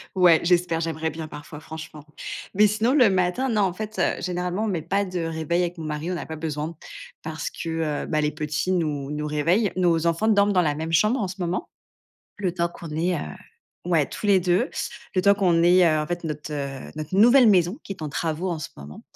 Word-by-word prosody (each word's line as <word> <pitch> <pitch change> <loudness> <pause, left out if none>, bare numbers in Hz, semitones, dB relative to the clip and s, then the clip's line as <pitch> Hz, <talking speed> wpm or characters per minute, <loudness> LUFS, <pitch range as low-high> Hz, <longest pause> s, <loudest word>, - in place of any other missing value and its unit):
Ouais, 175 -3 +6
j'espère, 175 -1 +2
j'aimerais 160 -1 -2
bien, 160 -1 -6
parfois, 150 0 -10
franchement. 155 -1 -9 0.5
Mais 210 +2 +5
sinon, 220 +5 +1
le 250 -8 +6
matin, 190 +8 +1
non, 210 -3 +2
en 185 -2 +1
fait, 215 +2 -6
heu, - - +1
généralement, 180 +3 -2
on - - 0
met 170 -5 -1
pas 195 +5 0
de 185 -2 -4
réveil 165 +2 -1
avec 175 0 -3
mon 160 - -6
mari. 155 +2 -4
On 180 - -1
n'a - - -5
pas 160 -1 -7
besoin, 155 0 -3 0.5
parce - - -4
que, 160 - -3
heu, - - -5
bah, 155 -2 0
les 150 0 +1
petits 150 +3 -2
nous 150 -6 -1
nous 150 0 -3
réveillent. 170 +8 +1
Nos 170 -2 +2
enfants 170 +7 +1
dorment 205 -1 +4
dans 180 - +4
la 150 -4 +1
même 160 +2 -4
chambre 215 - +3
en 195 - -1
ce 185 - -7
moment. 180 0 -2 0.7
Le 185 -4 -1
temps 170 -1 0
qu'on 170 -2 -10
ait, 175 +2 +1
heu, - - -2 0.7
ouais, 160 -5 +3
tous 210 - -5
les 195 -2 +5
2, 180 +7 +1 0.5
le 185 - +3
temps 200 0 +6
qu'on 175 -4 +2
ait, 180 +1 +6
heu, 155 -2 +4
en 150 - -1
fait 175 +1 -4
notre, 150 -1 -5
heu, 140 -2 -5
notre 155 +4 -4
nouvelle 240 +2 +7
maison, 180 +2 +3
qui 195 - -5
est 160 - -10
en 150 - -3
travaux 165 +4 -2
en 160 - -3
ce - - -6
moment. 70 +2 -10
170 Hz, 230 wpm, -24 LUFS, 155-190 Hz, 0.7 s, nouvelle